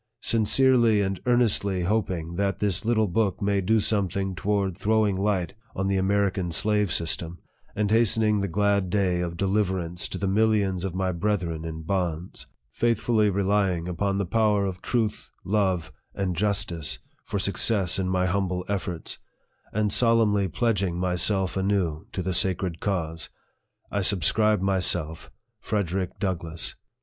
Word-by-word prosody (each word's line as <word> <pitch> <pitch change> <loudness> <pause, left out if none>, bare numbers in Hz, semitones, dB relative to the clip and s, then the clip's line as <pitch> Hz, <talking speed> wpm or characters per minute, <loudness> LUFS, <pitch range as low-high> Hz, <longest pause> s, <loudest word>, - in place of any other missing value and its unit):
Sincerely 115 0 +3
and 95 -1 -2
earnestly 105 -6 +2
hoping 90 -4 -1
that 100 +1 0
this 100 -2 0
little 110 -1 +2
book 100 0 0
may 100 0 +1
do 110 +4 +2
something 100 -2 0
toward 100 0 -1
throwing 105 0 +1
light 95 -4 -1 0.2
on 95 - -1
the 95 0 +1
American 95 -2 0
slave 105 +1 +1
system, 85 +1 -1 0.4
and 105 0 0
hastening 110 -1 +3
the 100 - -1
glad 100 0 +1
day 90 -2 +1
of 85 -1 -4
deliverance 95 -3 -1
to - - -5
the 100 - -2
millions 100 -3 +1
of 95 -2 -3
my 95 0 0
brethren 85 -3 -2
in 80 -1 -6
bonds 90 -1 -3 0.2
faithfully 110 - +1
re 100 0 0
lying 95 -4 +1
upon 95 +3 -1
the 100 - 0
power 105 +1 +2
of 95 -2 -5
truth, 115 -3 -2
love, 95 -4 0 0.2
and 95 -3 -2
justice, 100 -5 -1 0.3
for 105 - -4
suc 100 -1 -1
cess 100 -5 +3
in 95 -1 -1
my 90 0 +1
humble 90 -1 -1
efforts 90 -4 -4 0.5
and 105 -1 0
solemnly 110 -4 +3
pledging 100 -3 0
my 90 0 0
self 95 +1 +1
anew 95 -5 -1
to 95 - -3
the 95 +1 -2
sacred 90 -1 0
cause, 80 -5 -3 0.6
I 100 - 0
subscribe 105 +3 +3
myself, 90 -4 +1 0.3
FREDERICK 95 -3 -2
DOUGLASS. 85 -4 -3
95 Hz, 150 wpm, -25 LUFS, 90-105 Hz, 0.6 s, Sincerely